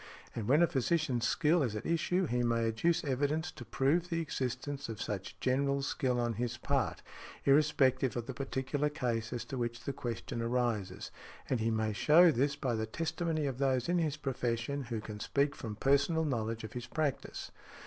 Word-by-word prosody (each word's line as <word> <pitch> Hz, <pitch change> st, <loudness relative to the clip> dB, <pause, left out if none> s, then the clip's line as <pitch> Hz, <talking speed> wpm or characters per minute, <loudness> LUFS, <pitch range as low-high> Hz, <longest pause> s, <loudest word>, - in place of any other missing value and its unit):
And 110 Hz, -3 st, -4 dB
when 145 Hz, +7 st, +5 dB
a -, -, +5 dB
physician's 135 Hz, -4 st, +1 dB
skill 165 Hz, +1 st, +3 dB
is 120 Hz, -6 st, 0 dB
at 105 Hz, -, -5 dB
issue 175 Hz, +3 st, +1 dB
he 125 Hz, -5 st, 0 dB
may 115 Hz, -1 st, +2 dB
adduce 170 Hz, +10 st, +1 dB
evidence 145 Hz, +4 st, 0 dB
to 130 Hz, -, -10 dB
prove 140 Hz, +9 st, +1 dB
the 165 Hz, -2 st, 0 dB
existence 135 Hz, -3 st, -3 dB
of 110 Hz, -, -5 dB
such 100 Hz, -3 st, -4 dB
general 140 Hz, +2 st, +1 dB
skill 125 Hz, -2 st, 0 dB
on 120 Hz, -1 st, 0 dB
his 120 Hz, -1 st, -2 dB
part, 130 Hz, -1 st, -1 dB, 0.4 s
irrespective 135 Hz, -3 st, +3 dB
of 120 Hz, -, -3 dB
the 130 Hz, -, -5 dB
particular 135 Hz, +2 st, -1 dB
case 120 Hz, -6 st, -2 dB
as 120 Hz, -1 st, -3 dB
to 130 Hz, +1 st, -5 dB
which 120 Hz, 0 st, -2 dB
the 140 Hz, -, -3 dB
question 120 Hz, -2 st, -4 dB
arises; 115 Hz, -5 st, -1 dB, 0.4 s
and 130 Hz, -, +2 dB
he 110 Hz, +1 st, +1 dB
may 110 Hz, -1 st, 0 dB
show 165 Hz, +10 st, +6 dB
this 140 Hz, +2 st, +1 dB
by 135 Hz, -4 st, -1 dB
the 110 Hz, -1 st, -1 dB
testimony 160 Hz, +3 st, -1 dB
of 135 Hz, -2 st, -3 dB
those 130 Hz, -3 st, +1 dB
in 175 Hz, 0 st, +2 dB
his 155 Hz, -3 st, 0 dB
profession 130 Hz, -1 st, -2 dB
who 115 Hz, -2 st, -3 dB
can 105 Hz, -1 st, -7 dB
speak 140 Hz, +6 st, +1 dB
from 110 Hz, -2 st, -6 dB
personal 140 Hz, +7 st, +2 dB
knowledge 115 Hz, -5 st, -2 dB
of 110 Hz, -, -7 dB
his 120 Hz, -1 st, -5 dB
practice. 150 Hz, 0 st, -2 dB
130 Hz, 190 wpm, -33 LUFS, 115-150 Hz, 0.4 s, show